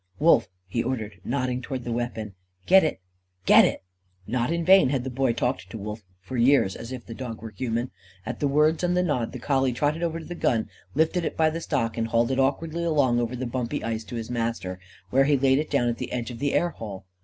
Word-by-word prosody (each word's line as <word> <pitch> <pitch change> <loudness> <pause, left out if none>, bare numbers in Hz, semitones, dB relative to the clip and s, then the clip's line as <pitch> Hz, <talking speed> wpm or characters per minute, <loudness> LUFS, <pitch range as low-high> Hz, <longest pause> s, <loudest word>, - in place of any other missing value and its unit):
"Wolf!" 150 -9 +4 0.2
he 95 +5 -1
ordered, 110 -6 -4
nodding 125 0 -1
towards 130 -1 -5
the 120 - -4
weapon. 115 -3 -3 0.3
"Get 190 +1 +7
it! 150 -11 -1 0.4
Get - - +8
it!" - - -2 0.4
Not 120 +3 -1
in 170 0 -1
vain 190 -6 +7
had 135 -2 0
the 130 - -4
Boy 130 0 +1
talked 120 +3 -2
to 115 - -7
Wolf, 105 +2 -6 0.2
for 95 +8 -6
years, 120 -5 +4
as 115 - -8
if 125 -3 -7
the 115 - -8
dog 115 -2 -6
were 115 -1 -8
human. 120 +1 -2 0.3
At - - -5
the 145 - +1
words 150 +4 +3
and 180 0 +2
the 180 - +3
nod, 125 -9 -1
the - - -6
collie 135 0 +1
trotted 150 +6 0
over 165 -1 -1
to 165 - -8
the 175 - -6
gun, 115 -9 0 0.3
lifted 160 +3 +2
it - - -3
by 160 -1 +3
the 165 +1 -4
stock, 115 -8 -1
and 115 - 0
hauled 115 +2 +2
it 130 - 0
awkwardly 160 +5 0
along 140 -7 +2
over 120 +1 -1
the 130 +1 -3
bumpy 120 -1 -3
ice 115 0 -2
to 120 - -7
his 115 0 -5
master, 115 -6 -2 0.3
where 135 +1 +4
he 145 0 +3
laid 135 +1 +3
it 155 - -3
down 120 - +2
at 120 - -1
the - - -5
edge 120 -1 -3
of 115 - -8
the 140 +1 0
air 175 - +2
hole. 100 - -8
125 Hz, 245 wpm, -26 LUFS, 115-145 Hz, 0.4 s, Get